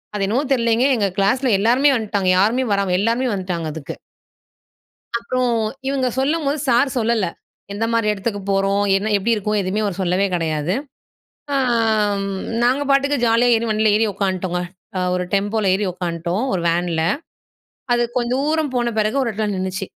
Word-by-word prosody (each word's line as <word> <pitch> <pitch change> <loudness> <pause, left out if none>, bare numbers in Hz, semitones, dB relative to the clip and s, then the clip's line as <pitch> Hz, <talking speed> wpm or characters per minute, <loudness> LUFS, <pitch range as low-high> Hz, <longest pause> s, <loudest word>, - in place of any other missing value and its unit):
அது 195 -1 0
என்னவோ 250 +8 +1
தெரியலேங்க, 235 0 +2
எங்க 200 -2 +1
கிளாஸ்ல 245 +7 +2
எல்லோருமே 250 +7 +4
வந்துட்டாங்க. 205 -4 -1
யாருமே 235 +6 +2
வராம 200 -2 0
எல்லாருமே 235 +4 +1
வந்ட்டாங்க 180 -3 -3
அதுக்கு. 155 -3 -7 1.2
அப்புறம் 245 +1 -1 0.3
இவுங்க 270 -2 0
சொல்லும்போது, 295 +1 0
சார் 245 +4 +3
சொல்லல. 230 -3 +1 0.5
எந்தமாரி 225 +1 0
இடத்துக்கு 205 0 -3
போறோம்? 195 +1 +1
என்ன, 210 +2 -2
எப்பிடி 230 +4 +1
இருக்கும்? 210 0 -1
எதுவுமே 195 +3 -1
அவர் 195 -1 -3
சொல்லவே 185 +2 +1
கெடையாது. 160 +1 -1 0.8
ஆம் 220 -5 +1 0.4
நாங்க 260 +4 +2
பாட்டுக்கு 280 +1 +3
ஜாலியா 235 +2 +3
ஏறி, 230 +1 -1
வண்டில 215 0 +2
ஏறி 220 +1 +3
உட்காந்துட்டோங்க. 185 -2 -2 0.4
அ - - 0
ஒரு 180 0 0
டெம்போல 205 +1 +1
ஏறி 205 +1 -1
உட்காந்துட்டோம். 175 +4 -3
ஒரு 180 - -1
வேன்ல 170 -1 0 0.9
அது 240 - +2
கொஞ்ச 240 -1 0
தூரம் 305 -1 0
போன 240 -1 0
பிறகு 215 +6 0
ஒரு 240 - 0
இடத்துல 210 0 -2
நின்னுச்சு. 190 +1 -3
215 Hz, 150 wpm, -20 LUFS, 195-240 Hz, 1.2 s, எல்லோருமே